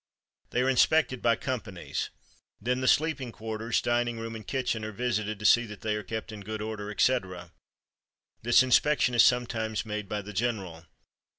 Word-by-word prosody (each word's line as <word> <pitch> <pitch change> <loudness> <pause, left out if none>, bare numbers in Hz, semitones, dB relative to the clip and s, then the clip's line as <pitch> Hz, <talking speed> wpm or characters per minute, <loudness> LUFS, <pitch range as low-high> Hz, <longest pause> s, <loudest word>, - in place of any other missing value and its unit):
They 125 - +1
are - - +1
inspected 135 0 +3
by 115 -1 +3
companies. 110 -5 -4 0.5
Then 125 +4 -1
the 130 - 0
sleeping 145 -5 +2
quarters, 110 +1 -2
dining 120 0 0
room, 115 0 -5
and 110 -3 -9
kitchen 125 0 -1
are 110 - -4
visited 110 -2 -2
to 105 - -8
see 120 +2 +5
that 105 -1 -10
they 110 -1 -1
are 105 - -3
kept 110 +2 -5
in 105 -1 -8
good 110 +2 -5
order, 105 -1 -5
etc. 95 -6 0 0.9
This 120 +3 +5
inspection 130 0 +3
is 120 - +6
sometimes 115 -3 +1
made 105 -2 -5
by 105 -1 -3
the 105 +2 -9
general. 95 -7 -3
110 Hz, 175 wpm, -28 LUFS, 105-125 Hz, 0.9 s, is